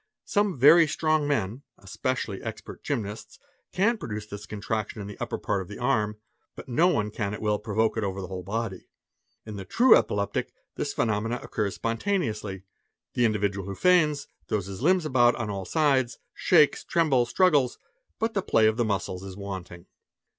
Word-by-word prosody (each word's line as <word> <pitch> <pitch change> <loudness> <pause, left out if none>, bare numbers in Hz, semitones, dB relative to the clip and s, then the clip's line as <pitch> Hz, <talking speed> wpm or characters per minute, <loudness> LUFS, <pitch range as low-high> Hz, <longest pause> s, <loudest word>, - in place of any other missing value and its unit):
Some 205 -5 +1
very 155 +6 +7
strong" 155 -1 +1
men, 115 -3 -1 0.2
especially 100 +1 -3
expert 110 -1 -8
gymnasts, 110 -7 -4 0.3
can 220 +5 +2
produce 105 -1 -5
this 105 0 -9
contraction 105 +1 -3
in 100 - -5
the 105 - -8
upper - - -3
part 100 -2 -1
of 95 - -8
the 100 - -8
arm, 110 -4 0 0.4
but - - -10
no 150 +8 +3
one 110 - 0
can 105 -1 -3
at - - -8
will 105 -1 0
provoke 110 +1 0
it 110 - 0
over 95 -1 -3
the 95 - -4
whole 90 0 -6
body; 100 0 -4 0.6
in 105 -2 -7
the 95 - -5
true 240 - +6
epileptic 100 0 0 0.2
this - - -2
phenomenon 115 +2 -1
occurs 105 -3 -2
spontaneously. 115 - -2 0.5
The 120 - +2
individual 100 -3 0
who 100 - -5
feigns, 155 - +3 0.2
throws 100 -4 -1
his 100 +2 -7
lmbs 180 +3 +3
about 125 -4 +4
on 110 -3 -3
all 95 -1 -4
sides, 130 - +1 0.2
shakes, 155 -5 +4
trembles, 135 -8 +2
struggles, 145 -7 +3 0.4
but 225 0 -1
the 195 - 0
play 110 -11 +3
of 110 +1 +3
the 120 - +2
muscles 95 -3 -2
is 95 -1 -9
wanting. 95 -3 -7
110 Hz, 175 wpm, -26 LUFS, 100-145 Hz, 0.6 s, very